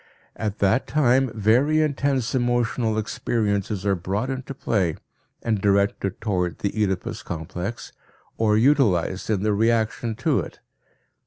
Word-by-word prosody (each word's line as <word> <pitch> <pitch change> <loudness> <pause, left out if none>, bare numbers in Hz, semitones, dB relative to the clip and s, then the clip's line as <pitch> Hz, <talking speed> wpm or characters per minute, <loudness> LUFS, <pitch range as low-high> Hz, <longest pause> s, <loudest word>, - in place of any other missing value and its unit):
At 110 -2 -3
that 100 +6 +2
time 135 -3 +3
very 125 +9 +3
intense 140 -5 0
emotional 120 -3 0
experiences 105 -2 -1
are 100 - +3
brought 100 +8 -2
into 135 +1 -5
play 95 - 0 0.5
and 110 -3 0
directed 100 -1 +1
towards 90 -5 -1
the 100 - 0
Oedipus 100 -4 -1
complex, 90 +6 -6 0.4
or 105 -1 +2
utilized 110 - +2
in 105 -3 0
the 105 -1 +2
reaction 115 +1 +1
to - - +1
it. - - -7
110 Hz, 130 wpm, -24 LUFS, 100-120 Hz, 0.5 s, time